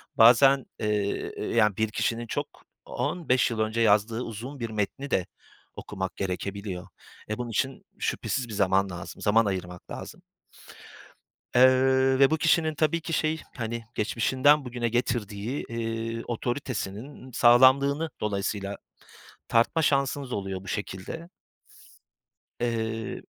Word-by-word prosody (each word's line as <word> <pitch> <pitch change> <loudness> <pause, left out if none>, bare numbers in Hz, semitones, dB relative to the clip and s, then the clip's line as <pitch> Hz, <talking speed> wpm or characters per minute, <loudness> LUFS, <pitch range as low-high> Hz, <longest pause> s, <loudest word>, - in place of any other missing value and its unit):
bazen, 130 +4 +6
eee, 105 -2 -1 0.2
yani, 105 -4 +3
bir 110 0 +1
kişinin 115 +2 -1
çok - - -2 0.4
15 130 -9 0
yıl 110 - -3
önce 110 +1 0
yazdığı 110 +2 +3
uzun 125 +5 -7
bir 115 - -3
metni 110 +6 -3
de 90 - +1 0.5
okumak 95 -2 -5
gerekebiliyor. 95 0 -4 0.4
E, 110 - -2
bunun 120 -1 -4
için 130 +4 -2 0.2
şüphesiz 125 - -2
bir 110 - -8
zaman 95 0 +2
lazım, 90 -1 -8
zaman 110 +2 +4
ayırmak 90 -3 -5
lazım. - - -8 1.3
Eee, 130 +1 +5
ve 135 -1 +7
bu 160 - +3
kişinin 160 -1 +2
tabii 160 +2 +1
ki 165 - -5
şey, 155 0 0 0.2
hani, 115 0 -3
geçmişinden 130 +6 +3
bugüne 120 -1 -2
getirdiği, 115 0 -2
eee, 115 0 -3
otoritesinin 120 +1 -4
sağlamlığını 130 +6 +5
dolayısıyla 100 -1 -2 0.7
tartma 120 +8 +3
şansınız 140 -2 +1
oluyor 95 -1 -3
bu - - -10
şekilde. 105 - -5 1.3
Eee 115 -1 -2
115 Hz, 120 wpm, -27 LUFS, 105-130 Hz, 1.3 s, ve